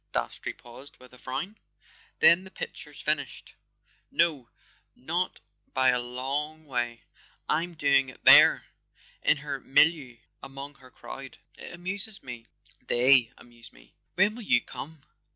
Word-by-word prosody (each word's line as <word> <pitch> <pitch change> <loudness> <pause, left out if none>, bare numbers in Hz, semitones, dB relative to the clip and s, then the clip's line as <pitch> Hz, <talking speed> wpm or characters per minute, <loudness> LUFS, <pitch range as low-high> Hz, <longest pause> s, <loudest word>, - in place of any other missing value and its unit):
Dastrey - - -3
paused 125 +4 -14
with 125 0 -17
a 125 - -15
frown. 150 - -5 0.6
"Then 170 +2 +6
the 190 - -12
picture's 485 - -8
finished?" - - -3 0.6
"No—not 160 - -3 0.3
by 130 0 +4
a 125 -1 +2
long 140 +6 -4
way. 120 -4 -3 0.4
I'm 170 +3 -1
doing 140 -3 +2
it 130 - -16
there—in - - +4
her 140 -1 -5
milieu, 135 -2 +2 0.2
among 135 +1 -9
her 130 - -16
crowd. 135 +1 -10 0.2
It - - -10
amuses 195 +4 -1
me; 120 -3 -9 0.4
they 125 -1 +4
amuse 120 -1 -16
me. - - -21 0.2
When 195 +4 +4
will 240 - -9
you 125 - +2
come?" 155 -1 -10
135 Hz, 130 wpm, -27 LUFS, 125-160 Hz, 0.6 s, Then